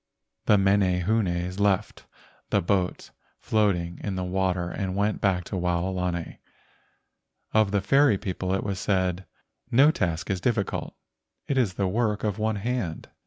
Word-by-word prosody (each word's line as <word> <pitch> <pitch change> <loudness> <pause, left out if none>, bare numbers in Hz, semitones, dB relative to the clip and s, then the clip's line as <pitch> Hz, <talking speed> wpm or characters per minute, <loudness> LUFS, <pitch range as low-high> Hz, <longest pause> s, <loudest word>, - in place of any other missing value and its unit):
The 105 - +6
menehunes 95 -1 +1
left 100 0 0 0.4
the - - +3
boat 90 0 -1 0.3
floating 90 -6 0
in 100 -3 -2
the 95 - -2
water 90 -1 -1
and 95 -2 -3
went 100 +1 0
back 95 -3 +1
to 95 - -6
Waolani. 90 -1 -2 1.1
Of 110 -2 +4
the 100 0 +1
fairy 135 +2 +4
people 95 -1 -3
it 95 - -2
was 100 -2 -3
said: 95 -1 0 0.4
"No 140 +6 +6
task 90 - -2
is 95 -2 -2
difficult. 110 -4 -1 0.5
It 140 -3 +1
is 100 -8 +1
the 100 - 0
work 105 +1 0
of 105 -1 -1
one 110 0 0
hand." 105 -6 -3
95 Hz, 145 wpm, -26 LUFS, 90-105 Hz, 1.1 s, The